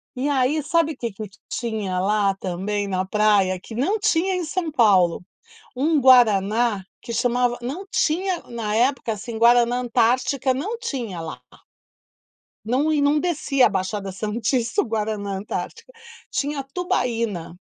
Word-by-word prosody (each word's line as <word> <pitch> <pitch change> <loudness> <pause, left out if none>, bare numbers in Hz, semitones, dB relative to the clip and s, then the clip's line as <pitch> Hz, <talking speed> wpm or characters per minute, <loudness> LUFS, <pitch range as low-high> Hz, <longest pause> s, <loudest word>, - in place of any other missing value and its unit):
e 270 +3 -1
aí 275 +3 +1
sabe 320 +1 +1
o - - -17
que 235 -3 -4
que 210 +2 -7 0.2
tinha 215 -6 -3
lá 200 0 +1
também 195 +2 -3
na 185 -1 -1
praia 200 -2 +2
que 220 - -11
não 315 - 0
tinha 380 -2 +1
em 360 - -2
São 325 0 -3
Paulo. 190 - +3 0.5
Um 300 +3 +2
guaraná, 225 -4 +4 0.2
que 235 - -6
chamava 245 0 +1
não 320 +11 -5
tinha 355 +3 0
na 225 -3 -3
época, 240 -1 +1
assim, 225 +2 -6
Guaraná 240 +1 +4
Antártica 250 +3 +1
não 410 - -3
tinha 240 - -4
lá. 160 -1 -7 1.2
Não 270 +7 +1
e 295 - +2
não 285 +1 +3
descia 295 -6 +2
a - - +4
Baixada 195 +1 -3
Santista, 230 - -1
o - - -4
Guaraná 215 -3 -3
Antártica, 210 - -6 0.4
tinha 285 -1 -2
Tubaína. 230 - -1
235 Hz, 145 wpm, -22 LUFS, 210-285 Hz, 1.2 s, guaraná